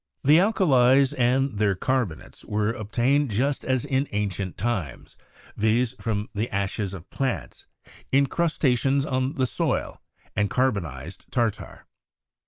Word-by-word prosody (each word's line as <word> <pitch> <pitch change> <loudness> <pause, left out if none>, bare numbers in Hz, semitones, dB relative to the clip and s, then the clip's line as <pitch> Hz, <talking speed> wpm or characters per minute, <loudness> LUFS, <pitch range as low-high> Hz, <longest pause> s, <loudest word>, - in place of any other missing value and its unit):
The 150 +4 +6
alkalies 140 - +4
and 130 -3 +1
their 100 -3 +2
carbonates 115 -6 -2
were 105 +1 0
obtained 125 +6 +1
just 130 +7 0
as 130 -1 0
in 135 0 0
ancient 100 -3 -3
times, 95 - -3 0.4
viz., 110 +3 +1
from 105 -2 -2
the 110 +3 -2
ashes 100 0 -2
of 90 -1 -11
plants, 135 -2 -3 0.4
incrusta 140 0 +2
tions 135 +2 +1
on 130 0 -1
the 130 -4 +1
soil, 120 - -2 0.3
and 105 -1 +1
carbonized 90 - -2
tartar. 120 -5 -2
120 Hz, 125 wpm, -25 LUFS, 105-135 Hz, 0.4 s, The